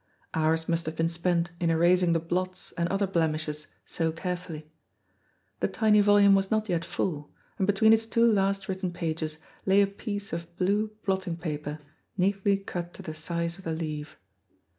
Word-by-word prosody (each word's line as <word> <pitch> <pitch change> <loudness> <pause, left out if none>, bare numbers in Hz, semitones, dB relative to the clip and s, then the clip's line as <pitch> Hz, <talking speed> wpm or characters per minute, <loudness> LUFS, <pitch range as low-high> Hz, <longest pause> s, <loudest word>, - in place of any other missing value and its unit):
Hours 160 +1 +1
must 170 -1 0
have 160 - -3
been 165 +1 +1
spent 170 0 0
in 170 - +1
erasing 170 +1 +4
the 165 - +2
blots 185 +3 -3
and 170 0 -1
other 195 +1 +1
blemishes 155 -4 -1 0.2
so 165 -1 -1
carefully. 165 -2 -5 0.9
The - - +1
tiny 215 -2 +4
volume 205 -1 +6
was 195 0 +2
not 215 0 +1
yet 170 -4 0
full, 150 -3 -3 0.3
and 190 - +2
between 220 +2 +5
its 225 0 +2
two 230 +1 +3
last 195 -1 +1
written 185 -1 -2
pages 160 -2 -3 0.3
lay 195 +1 +4
a 200 - +6
piece 205 0 -5
of 170 0 -6
blue 205 +4 +1 0.2
blotting 190 -3 -1
paper 150 -3 -4 0.4
neatly 195 +1 +2
cut 175 -3 -6
to 195 - -10
the 160 -4 -5
size 170 +2 -3
of - - -12
the 165 - -2
leaf. 155 -2 -5
175 Hz, 175 wpm, -28 LUFS, 165-195 Hz, 0.9 s, volume